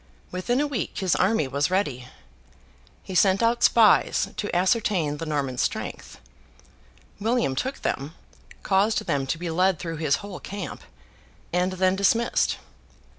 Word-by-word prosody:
Within 185 Hz, +8 st, -1 dB
a 295 Hz, -, +2 dB
week, 275 Hz, -8 st, -3 dB
his 185 Hz, -3 st, +1 dB
army 185 Hz, -6 st, +2 dB
was 140 Hz, +3 st, 0 dB
ready. 145 Hz, -10 st, -1 dB, 1.0 s
He 190 Hz, -, -8 dB
sent 190 Hz, +3 st, +3 dB
out 235 Hz, +1 st, +2 dB
spies 225 Hz, -3 st, +4 dB
to 205 Hz, -, -3 dB
ascertain 180 Hz, -5 st, +1 dB
the 165 Hz, -, -5 dB
Norman 140 Hz, -5 st, -2 dB
strength. -, -, -3 dB, 1.0 s
William 225 Hz, -, 0 dB
took 265 Hz, -, -3 dB
them, 140 Hz, +4 st, -3 dB, 0.5 s
caused 200 Hz, +3 st, +2 dB
them 135 Hz, -2 st, -1 dB
to 160 Hz, -, -1 dB
be 170 Hz, 0 st, -4 dB
led 185 Hz, +2 st, +2 dB
through 165 Hz, -1 st, -5 dB
his 150 Hz, -2 st, +2 dB
whole 200 Hz, -3 st, -7 dB
camp, 200 Hz, -3 st, -7 dB, 0.7 s
and 180 Hz, +1 st, +1 dB
then 185 Hz, 0 st, +2 dB
dismissed. 225 Hz, +4 st, +2 dB
185 Hz, 140 wpm, -25 LUFS, 155-205 Hz, 1.0 s, spies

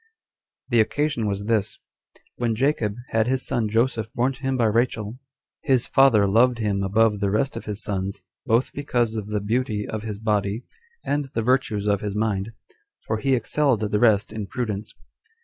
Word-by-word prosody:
The 120 Hz, -3 st, +3 dB
occasion 130 Hz, 0 st, +1 dB
was 100 Hz, 0 st, -2 dB
this:When 115 Hz, +1 st, -3 dB
Jacob 115 Hz, -5 st, +1 dB
had 110 Hz, 0 st, +1 dB
his 130 Hz, 0 st, 0 dB
son 110 Hz, -3 st, 0 dB
Joseph 115 Hz, 0 st, 0 dB
born 125 Hz, +3 st, +1 dB
to 135 Hz, -, -16 dB
him 135 Hz, -1 st, 0 dB
by 120 Hz, -, +2 dB
Rachel, 115 Hz, 0 st, 0 dB, 0.4 s
his 130 Hz, -4 st, +2 dB
father 120 Hz, -7 st, +5 dB
loved 120 Hz, +4 st, +4 dB
him 105 Hz, -3 st, 0 dB
above 105 Hz, +2 st, +2 dB
the 100 Hz, -1 st, +1 dB
rest 120 Hz, +7 st, 0 dB
of -, -, -6 dB
his 105 Hz, 0 st, -4 dB
sons, 95 Hz, -2 st, -3 dB, 0.2 s
both 115 Hz, +2 st, +2 dB
because 120 Hz, -5 st, 0 dB
of 105 Hz, -2 st, -4 dB
the 105 Hz, 0 st, -1 dB
beauty 105 Hz, 0 st, -1 dB
of 110 Hz, -, -4 dB
his 105 Hz, -1 st, -5 dB
body, 105 Hz, +1 st, -1 dB, 0.4 s
and 145 Hz, 0 st, 0 dB
the 115 Hz, -, 0 dB
virtues 120 Hz, -4 st, +1 dB
of 100 Hz, -2 st, +1 dB
his 105 Hz, -1 st, -3 dB
mind, 105 Hz, -1 st, -1 dB, 0.5 s
for 110 Hz, 0 st, -1 dB
he 135 Hz, +1 st, +2 dB
excelled 130 Hz, 0 st, +1 dB
the 105 Hz, -1 st, 0 dB
rest 110 Hz, -3 st, +3 dB
in 105 Hz, -2 st, -4 dB
prudence. 110 Hz, -2 st, -4 dB
110 Hz, 175 wpm, -24 LUFS, 105-125 Hz, 0.5 s, father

